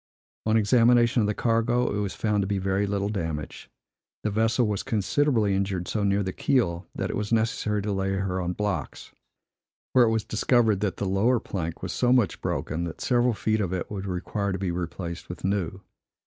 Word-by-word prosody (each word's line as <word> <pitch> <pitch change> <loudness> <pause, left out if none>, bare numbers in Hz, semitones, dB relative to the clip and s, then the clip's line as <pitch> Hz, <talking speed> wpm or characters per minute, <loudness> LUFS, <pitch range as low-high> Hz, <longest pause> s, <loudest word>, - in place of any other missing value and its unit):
On 110 +1 +4
examination 120 +2 +4
of 105 - +1
the 105 - -1
cargo, 115 0 +1
it - - -1
was 100 -3 -2
found 105 -2 +1
to 95 - -1
be 100 0 0
very 95 +1 0
little 100 0 -1
damaged. 80 -7 -4 0.5
The 105 - 0
vessel 115 +4 +2
was 105 -2 -1
considerably 110 0 +1
injured 95 -2 -1
so 105 - -1
near 100 0 +2
the 95 -1 -3
keel, 90 -10 0
that - - -2
it - - -4
was 105 +1 -3
necessary 110 -2 +1
to 105 - -2
lay 95 0 0
her 95 -1 -1
on 90 0 -2
blocks, 105 0 -3 0.8
where 125 -2 +6
it - - +2
was 110 -1 0
discovered 110 -2 +2
that 100 -2 -1
the - - -2
lower 105 +6 +2
plank 85 -6 -5
was - - -3
so 125 -1 +2
much 125 -6 +2
broken 80 +2 -2
that 85 - -7
several 120 -2 +2
feet 110 +1 0
of 95 -3 -2
it 95 - -3
would 100 -1 -4
require 100 +2 -2
to 95 - -2
be 95 -2 -2
replaced 85 0 -5
with 90 - -8
new. 95 -1 -1
100 Hz, 205 wpm, -26 LUFS, 95-110 Hz, 0.8 s, where